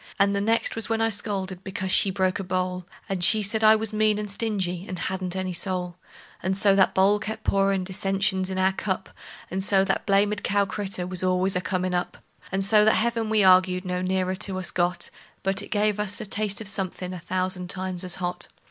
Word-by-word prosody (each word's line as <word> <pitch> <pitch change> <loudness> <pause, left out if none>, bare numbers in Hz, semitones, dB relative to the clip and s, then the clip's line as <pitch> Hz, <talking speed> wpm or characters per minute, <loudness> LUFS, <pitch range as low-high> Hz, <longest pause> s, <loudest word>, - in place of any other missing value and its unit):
And 200 -1 +3
the 200 - 0
next 225 +3 +1
was 225 0 -2
when 225 0 0
I 225 0 +2
scolded 195 -3 -3
because 190 -1 -3
she 195 - +4
broke 185 0 0
a - - -3
bowl; 185 -1 -3 0.2
And 190 -2 -2
she 215 +4 +5
said 220 +2 0
I 215 0 +8
was 220 0 -1
mean 215 0 +2
and 210 -1 -4
stingy, 190 -5 -2
and 185 - -5
hadn't 185 +1 -3
any 185 -1 -3
soul. 180 -1 -2 0.4
And 190 +2 -1
so 200 0 +5
that 195 -1 +3
bowl 200 +2 +4
kept 220 +1 -6
pourin' 195 -1 +1
dissensions 195 0 -1
in 190 - -4
our 190 0 +3
cup; 190 0 -3 0.4
And 190 +1 -2
so 195 -1 +3
that - - -1
blamed 205 +1 +2
cow 200 0 +2
critter 195 -2 -3
was 180 0 -1
always 185 +1 +1
a 180 - 0
comin' 185 +1 -2
up; 175 0 -2 0.3
And 195 0 0
so 210 +1 +5
that 215 - +4
heaven 230 -1 0
we 215 -1 +3
arg'ed 185 0 +4
no 180 0 -2
nearer 185 0 0
to 190 -1 0
us 185 -3 -2
got, 175 0 0 0.3
But 195 0 +1
it - - -8
gave 210 0 +1
us 205 -1 -1
a - - -4
taste 205 0 0
of 215 - -5
somethin' 185 -2 -2
a 180 - -6
thousand 185 +1 -2
times 185 -1 -1
as 180 -1 -3
hot. 180 0 -2
190 Hz, 220 wpm, -25 LUFS, 185-205 Hz, 0.4 s, I